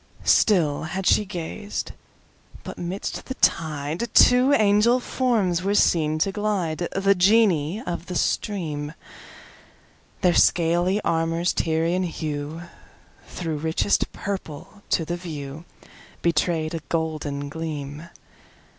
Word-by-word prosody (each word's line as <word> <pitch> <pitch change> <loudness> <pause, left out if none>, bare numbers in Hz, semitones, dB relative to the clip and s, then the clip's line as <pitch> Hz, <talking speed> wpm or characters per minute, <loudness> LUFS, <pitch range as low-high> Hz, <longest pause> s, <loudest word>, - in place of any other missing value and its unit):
Still 165 -9 +3
had 190 +4 -4
she 210 - +4
gazed, 200 +3 -5 0.7
but - - -8
'midst 180 +3 -5
the 260 - -4
tideTwo 175 - +3
angel 215 +4 +4
forms 220 -9 0
were 200 +2 0
seen 155 -5 +3
to 195 +5 +1
glide, 185 -5 -1
The 195 +1 +3
Genii 195 - +3
of 175 0 -4
the 180 - -5
stream:Their 165 0 -4
scaly 175 +4 +3
armour's 165 +1 0
Tyrian 165 +3 0
hueThrough 155 +1 -5 0.9
richest 160 +5 0
purple, 195 0 -6
to 165 - +1
the 175 +2 -3 1.1
viewBetray'd 165 -1 +1
a 165 - -2
golden 155 -3 -2
gleam. 150 0 -6
170 Hz, 100 wpm, -24 LUFS, 160-200 Hz, 1.1 s, she